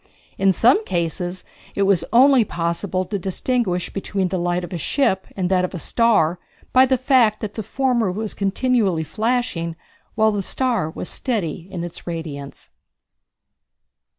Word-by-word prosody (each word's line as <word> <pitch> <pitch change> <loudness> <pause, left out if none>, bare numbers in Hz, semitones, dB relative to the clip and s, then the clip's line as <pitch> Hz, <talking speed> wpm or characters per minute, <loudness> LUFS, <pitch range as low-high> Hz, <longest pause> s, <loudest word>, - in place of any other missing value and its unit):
In 195 0 +4
some 245 - +4
cases 175 - -3 0.3
it 200 - +2
was 195 -4 +3
only 255 +1 +6
possible 180 +1 -2
to 200 +2 -3
distinguish 190 0 -1
between 195 -1 -2
the 185 0 -2
light 175 +1 -1
of 175 - -7
a - - -2
ship 190 - 0
and 185 -2 -1
that 185 -1 +3
of 185 - -3
a - - -3
star 180 -4 +2 0.3
by 260 +1 +6
the 260 0 +2
fact 245 -4 +3
that 210 -2 -4
the 220 - -4
former 240 -2 0
was 215 +3 -4
continually 200 -4 +1
flashing 215 - -1 0.4
while 220 0 +3
the 205 -1 -1
star 235 -5 0
was 170 - -6
steady 185 - -3
in 175 -3 -5
its 175 0 -7
radiance. 155 -5 -7
195 Hz, 155 wpm, -21 LUFS, 175-235 Hz, 0.4 s, only